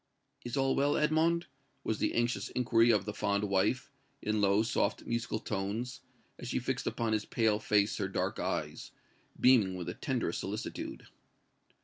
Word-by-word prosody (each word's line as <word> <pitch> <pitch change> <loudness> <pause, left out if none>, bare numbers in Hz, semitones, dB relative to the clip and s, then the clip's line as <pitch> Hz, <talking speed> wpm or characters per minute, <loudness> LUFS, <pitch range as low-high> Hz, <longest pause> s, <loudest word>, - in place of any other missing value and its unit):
"Is 120 +3 -4
all 135 0 +2
well, 140 +1 +2
Edmond?" 160 +3 +2 0.4
was 110 - -1
the - - 0
anxious 120 +1 0
inquiry 120 -2 +3
of 105 -4 +3
the 105 - -4
fond 100 0 0
wife, 105 +7 +1 0.3
in 105 0 0
low, 100 +2 +4
soft, 120 - 0
musical 120 -1 -1
tones, 110 +5 -3 0.4
as 125 - -7
she 125 - -1
fixed 130 +2 -2
upon 115 -2 0
his 105 -1 0
pale 110 -2 +1
face 105 -1 +2
her - - -1
dark - - -2
eyes, - - -3 0.5
beaming 110 -8 +5
with 90 -2 -5
the - - -4
tenderest - - -2
solicitude. - - -5
115 Hz, 160 wpm, -32 LUFS, 105-130 Hz, 0.5 s, beaming